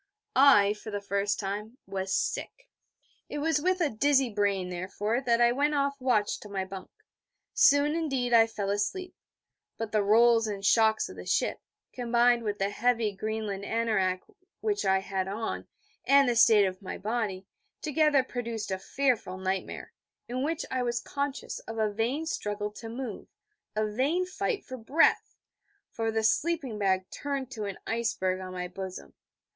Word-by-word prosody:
I, 210 -7 +6
for 210 +1 -10
the 205 -1 -3
first 200 +1 -1
time, 210 +4 -4
was 190 0 -4
sick. - - -2 0.6
It - - -4
was 300 0 +1
with 370 +2 +1
a 315 - +3
dizzy 270 +1 +2
brain, 200 -3 0
therefore, 200 +6 -2
that 235 -3 +2
I 240 0 +5
went 290 +4 +1
off 280 -1 0
watch 240 -5 +1
to 210 - -11
my 195 -1 -2
bunk. 190 0 -9 0.6
Soon, 285 +1 +5
indeed, 270 -7 -1
I 225 -1 +7
fell 200 -3 -3
asleep: 285 - -2 0.6
but 225 -1 -4
the 215 - +2
rolls 225 +2 +5
and 200 -1 -4
shocks 220 +1 +4
of - - -11
the - - -8
ship, - - +1 0.3
combined 240 0 +3
with 210 -2 -2
the 195 +1 -1
heavy 230 -1 +1
Greenland 210 -1 -4
anorak 200 -5 0 0.4
which 415 -2 -1
I 190 0 +3
had 190 -1 -2
on, 215 +3 -4 0.4
and 280 -1 +5
the 240 - +2
state 220 -3 +6
of 185 +1 -4
my 190 - -6
body, 210 -3 -2 0.4
together 300 -2 +3
produced 235 -5 -4
a 190 - -1
fearful 245 -7 0
nightmare, 190 0 -4 0.3
in 250 +2 -3
which 315 +3 -1
I 255 - 0
was 240 -1 0
conscious 280 -1 -4
of 225 - -6
a 215 -2 0
vain 245 +9 -1
struggle 210 -8 -3
to 225 +2 -9
move, 235 -2 -6 0.5
a 215 0 +1
vain 270 +12 0
fight 400 +4 -3
for 255 - -7
breath, 270 +8 +2 0.6
for 225 -1 -2
the 220 0 0
sleeping 275 -2 0
bag 190 -2 +1
turned 275 -2 -4
to 215 -3 -4
an 200 -1 -5
iceberg 215 -5 -1
on 185 0 -7
my 180 -1 -4
bosom. 185 - -8
225 Hz, 170 wpm, -28 LUFS, 200-265 Hz, 0.6 s, I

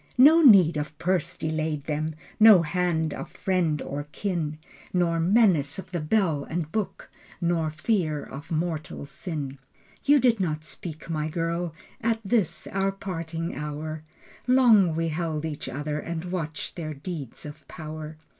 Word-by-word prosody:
No 305 +6 +8
need 190 - +7
of 150 0 -4
purse 180 0 0
delayed 155 -2 -2
them, 155 +1 -2 0.2
No 215 -5 +9
hand 160 -2 0
of - - -6
friend 175 -5 0
or 145 +1 -5
kin 165 -6 -2 0.3
Nor 170 -2 +1
menace 175 -6 +3
of 190 -1 -8
the 175 - -1
bell 155 -3 +1
and 160 0 -4
book, 215 -3 -3 0.3
Nor 170 -2 +1
fear 155 -2 0
of 145 +3 -9
mortal 160 -3 -2
sin. 140 -2 -5 0.4
You 290 0 +5
did 240 -3 +3
not 155 -4 -1
speak, 155 +2 -7
my 155 -2 -2
girl, 165 0 -2 0.3
At 230 0 +1
this, 210 -5 +1
our 195 0 +1
parting 165 -3 -4
hour. 150 +1 -4 0.5
Long 225 -10 +5
we 165 0 0
held 160 -1 -2
each 150 -4 -5
other 150 +3 -3
And 170 +2 -5
watched 160 -3 -4
their 155 -3 -4
deeds 145 -4 -6
of 150 +1 -10
power. 155 -1 -7
165 Hz, 150 wpm, -26 LUFS, 155-185 Hz, 0.5 s, No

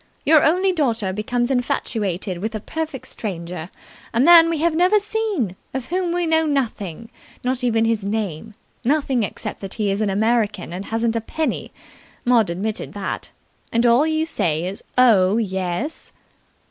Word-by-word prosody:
Your 310 0 +6
only 365 +5 +3
daughter 230 - 0
becomes 240 +5 -1
infatuated 205 -7 -1
with 220 +4 -3
a - - -2
perfect 285 +1 -5
stranger 175 -6 -5 0.5
a - - +2
man 330 +4 +8
we 330 - 0
have 330 +2 +1
never 360 +6 +4
seen 410 - -1 0.2
of 260 -1 -4
whom 360 0 0
we 350 0 0
know 320 -1 +2
nothing, 230 - -2 0.3
not 255 0 -1
even 225 -2 +2
his 225 -2 0
name 210 -1 -3 0.3
nothing 275 -2 +1
except 210 - -4
that 195 -1 -6
he 210 -3 0
is 200 +2 -1
an 210 - +1
American 210 -3 0
and 190 +3 -5
hasn't 225 0 -1
a 230 - 0
penny 310 +7 -3 0.5
Maud 235 -5 +4
admitted 200 +5 -3
that. 200 -1 -4 0.4
And 230 +1 +2
all 240 +6 +5
you 315 0 +1
say 165 - 0
is 190 +2 -5 0.2
'Oh, 215 -5 +5
yes'!" 190 - -2
230 Hz, 160 wpm, -21 LUFS, 200-300 Hz, 0.5 s, man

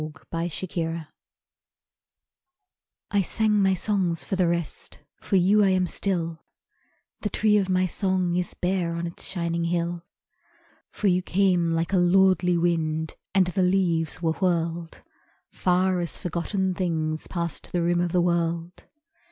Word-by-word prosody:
The 155 - -4 0.4
Tree 170 0 -3
of 165 0 -2
Song 165 -2 -7 2.0
I 205 - +3
sang 210 +2 +1
my 190 -1 +3
songs 185 -3 -1
for 195 - -2
the 185 -2 +2
rest, 170 -3 -3 0.2
For - - -2
you 195 +3 +5
I 195 - +4
am 185 -1 +2
still; 170 -3 -3 0.8
The 210 - -2
tree 215 0 +2
of 195 -2 0
my 185 0 +2
song 185 -2 0
is 180 0 -2
bare 180 -2 -1
On 170 0 -3
its 170 - -4
shining 170 -2 -1
hill. 170 0 -1 0.9
For - - -6
you 185 -2 +4
came 180 -3 +2
like 165 +3 -1
a - - +4
lordly 180 0 +4
wind, 160 -2 0 0.2
And 190 -1 +5
the 180 +2 -1
leaves 180 -3 +1
were 165 - +2
whirled 170 -2 -2 0.5
Far 185 0 +1
as 170 -1 -3
forgotten 185 +2 -2
things 160 -4 -2
Past 170 -3 -4
the 175 -1 0
rim 175 0 +2
of 175 -1 -1
the 180 - +3
world. 170 0 -1
175 Hz, 150 wpm, -25 LUFS, 170-190 Hz, 2.0 s, you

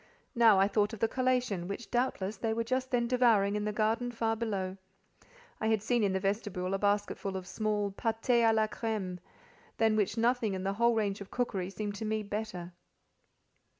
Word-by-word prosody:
Now 225 -4 +6
I 195 - +5
thought 205 +1 +1
of 225 - -6
the 225 - +3
collation, 250 -8 0
which 200 +5 -6
doubtless 240 -5 0
they 220 -1 -1
were 230 - 0
just 255 +2 -1
then 245 -2 +1
devouring 230 -5 +3
in 210 0 -1
the 210 - 0
garden 225 +3 0
far 225 -1 -1
below. 195 -4 -3 0.8
(I 220 - -1
had 220 -2 +1
seen 240 0 +1
in 200 - +2
the 190 - 0
vestibule 195 -2 -2
a 195 - 0
basketful 205 -1 0
of 185 - -7
small 210 +1 -1
pâtés 225 +4 +1
à 225 -1 +5
la 220 -1 +3
crême, 215 -5 -3 0.6
than 220 -1 +3
which 210 +1 0
nothing 230 -3 +1
in 185 - -4
the 195 0 0
whole 235 +3 +3
range 205 -2 -1
of 200 - -8
cookery 195 -7 -2
seemed 205 +2 -4
to 205 +2 -5
me 215 0 -1
better). 200 -4 -5
215 Hz, 195 wpm, -31 LUFS, 195-230 Hz, 0.8 s, Now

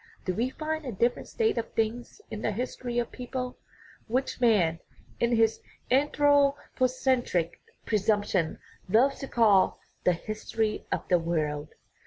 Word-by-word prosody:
Do 185 - 0
we 235 +6 0
find 315 +3 -3
a 260 - -4
different 235 +4 0
state 445 - +1
of 230 - -6
things 230 - -2
in 215 - -5
the - - 0
history 245 +2 -4
of 240 -1 0
peoples, 250 0 -4 0.5
which 255 +2 -1
man, 185 -9 +3 0.4
in 235 0 +2
his 225 -1 +2 0.3
anthropocentric 265 - +2 0.2
presump 210 -1 +2
tion, 170 -6 0 0.3
loves 250 +8 +4
to 275 - -5
call 210 -7 +4 0.2
"the 180 - +4
history 215 +3 -3
of - - -2
the 180 -2 +4
world"? 155 -3 -2
230 Hz, 140 wpm, -28 LUFS, 200-255 Hz, 0.5 s, loves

